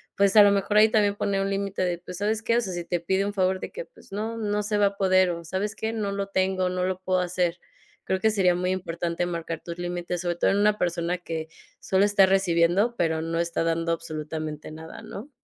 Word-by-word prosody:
Pues, 200 +1 +3
a 210 - +11
lo 205 - +6
mejor 200 +1 +1
ahí 215 +1 +7
también 205 -2 +2
poner 200 -1 0
un 195 - -1
límite 195 0 -2
de, 175 -1 0
pues, 180 0 -9
¿sabes 210 +3 0
qué? 230 +1 +1
O - - +3
sea, 190 -5 -4
si 175 0 -4
te 175 +1 -1
pide 190 +4 0
un 205 - -3
favor, 190 -1 +1
de - - -7
que, - - -6
pues, - - -20
no, 220 +3 -3
no 210 -1 -1
se 210 0 -1
va 205 -1 +4
a 200 0 -5
poder 185 -1 +4
o, 170 0 -6
¿sabes 195 +5 -3
qué?, 220 0 -3
no 210 -3 -2
lo 200 0 -3
tengo 190 -1 0
o - - +1
no 180 0 -2
lo 185 0 -2
puedo 185 0 +1
hacer. 180 -1 -1 0.5
Creo 190 - 0
que 220 +3 +3
sería 185 -4 +3
muy 180 +1 -1
importante 170 -1 -2
marcar 170 -2 -4
tus 170 0 -7
límites, 175 0 -3
sobre 175 -1 -1
todo - - +2
en 195 - +1
una 210 +1 +3
persona 175 0 -1
que 160 -2 -5 0.3
solo 190 +1 +2
está 205 -1 +5
recibiendo, 190 +3 +2
pero 160 -2 +1
no 165 +1 -2
está 170 -1 -1
dando 165 0 0
absolutamente 155 -2 -5
nada, 160 +1 -10
¿no? 220 +9 -8
185 Hz, 250 wpm, -26 LUFS, 170-200 Hz, 0.5 s, a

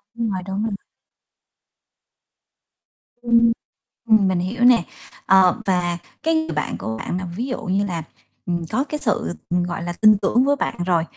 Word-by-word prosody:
Đúng 230 -1 -1
rồi, 185 -1 -3
đúng 195 +2 -2
rồi. 220 -2 -2 2.5
Ừm, 235 -1 +4 0.6
ừm, 215 -3 +5
mình 185 -2 +1
hiểu 215 +7 -2
nè. 245 -6 +6 0.4
Ờ, 190 -2 +5
và 180 -2 0 0.3
cái 325 - +2
người 315 0 0
bạn - - -2
của 110 0 -4
bạn 175 - -4
là 185 - -4
ví 240 - -3
dụ 260 -1 -4
như 195 +2 0
là, 170 -4 -4 0.4
ừm, 170 -1 -2
có 265 - +1
cái 300 +1 -5
sự, 145 - -1 0.2
ừm, 175 0 +1
gọi 175 -1 -4
là, 175 0 -3
tin 215 -1 +7
tưởng 220 +5 +2
với 285 +1 +3
bạn - - -2
rồi, 170 -3 +2
195 Hz, 175 wpm, -21 LUFS, 175-235 Hz, 2.5 s, tin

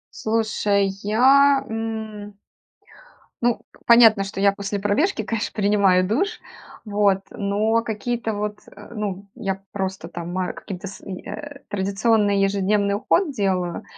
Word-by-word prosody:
Слушай, 215 -3 +1
я, 270 +6 +4
м 220 -2 -5 1.0
ну, 240 -1 +2 0.3
понятно, 225 -4 +7
что 195 0 -6
я 200 0 +5
после 200 0 -4
пробежки, 215 - +1
конечно, 225 +2 -3
принимаю 200 -3 +3
душ, 390 - 0 0.5
вот, 205 -2 +2
но 215 +3 +1
какие-то 225 +1 -3
вот, 210 0 -3
э, 205 +3 -13
ну, 200 -2 -4
я 195 -5 -3
просто 190 -3 -4
там 175 0 -7
ма 185 0 -2
каким-то 195 0 -7
с 195 - -10
и 185 -2 -7
э, 290 -2 -8
традиционный 205 +1 +1
ежедневный 200 +1 +1
уход 305 - +1
делаю, 185 -6 -1
205 Hz, 130 wpm, -22 LUFS, 195-225 Hz, 1.0 s, понятно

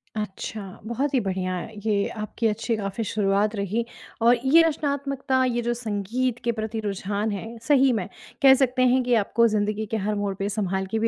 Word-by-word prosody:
अच्छा। 210 0 -4 0.2
बहुत 260 +6 -2
ही 260 - +4
बढ़िया 185 -2 -2 0.3
ये 205 -2 +1
आपकी 215 +2 -2
अच्छी 225 +2 -1
काफ़ी 200 +2 -3
शुरुआत 205 0 +1
रही 205 +3 -1 0.4
और 240 +2 +5
ये 315 +5 +7
रचनात्मकता, 280 -3 -1
ये 240 -1 0
जो 240 0 0
संगीत 235 +2 -2
के 235 - +1
प्रति 220 0 -4
रुझान 205 +1 -2
है, 225 +4 -6
सही 270 +1 +4
में, 200 -6 -2 0.3
कह 270 -1 +8
सकते 260 -1 +2
हैं 260 0 +3
कि 245 0 +1
आपको 230 +3 +3
ज़िंदगी 210 0 0
के 225 - +1
हर 215 - 0
मोड़ 205 -1 -1
पे 195 +1 -2
सँभाल 190 -2 -1
के 225 - 0
भी 225 - +2
220 Hz, 190 wpm, -25 LUFS, 205-250 Hz, 0.4 s, कह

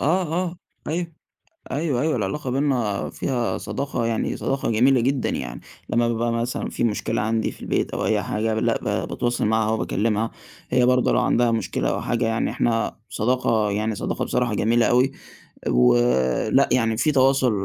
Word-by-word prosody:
آه، 175 +7 +2
آه، 180 -1 -2 0.3
أيوه، 165 +1 -2 0.6
أيوه، 140 -3 0
أيوه 155 -1 +1
العلاقة 120 +6 -2
بيننا 125 -7 0
فيها 120 -7 -2
صداقة 115 +3 -3
يعني 115 -1 -1
صداقة 135 -2 -1
جميلة 125 +3 +4
جدًا، 130 +1 0
يعني - - -4 0.3
لمّا 120 +1 +2
بابقى 115 0 0
مثلًا 115 +1 -2
في - - -3
مشكلة 110 -3 0
عندي 110 +1 0
في - - -15
البيت - - -1
أو - - -2
أي - - +1
حاجة، 110 +1 -1
لأ 110 - +1
ب - - -2
باتواصل 120 0 -1
معاها 110 0 +2
وباكلمها، 110 0 0 0.4
هي 125 0 +3
برضه 125 0 +3
لو - - +3
عندها 120 -1 +2
مشكلة 110 -5 -1
أو - - -2
حاجة 120 -1 0
يعني 115 0 0
إحنا 115 -1 0
صداقة 110 -2 +1
يعني 105 +2 -1
صداقة - - -2
بصراحة 120 -3 0
جميلة 115 +3 +2
أوي، 125 +3 +3 0.6
و - - +4 0.5
لأ - - +3
يعني 115 -3 +2
في 155 +5 +2
تواصل 135 -2 +3
120 Hz, 170 wpm, -23 LUFS, 110-130 Hz, 0.6 s, جميلة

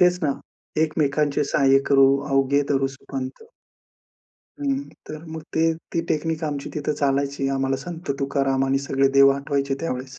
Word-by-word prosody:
तेच 180 0 +4
ना, 145 -3 +2 0.5
एकमेकांचे 150 -1 +1
सहाय्य 135 -1 +4
करू 135 -1 +6 0.2
अवघे 135 +1 +3
धरू 135 -1 +2
सुपंथ. 135 - -7 1.2
हं, 275 -2 0 0.3
तर 155 +1 -8
मग 160 -1 -6
ते 160 - +2 0.3
ती 170 - +1
टेक्निक 160 +1 -1
आमची 145 -2 -4
तिथं 150 0 -1
चालायची. 140 0 0
आम्हाला 135 0 0
संत 170 -3 -6
तुकाराम 135 -1 +1
आणि 135 0 +2
सगळे 135 0 +3
देव 140 0 +8
आठवायचे 140 -1 -1
त्यावेळेस. 130 -4 -4
140 Hz, 145 wpm, -23 LUFS, 135-155 Hz, 1.2 s, देव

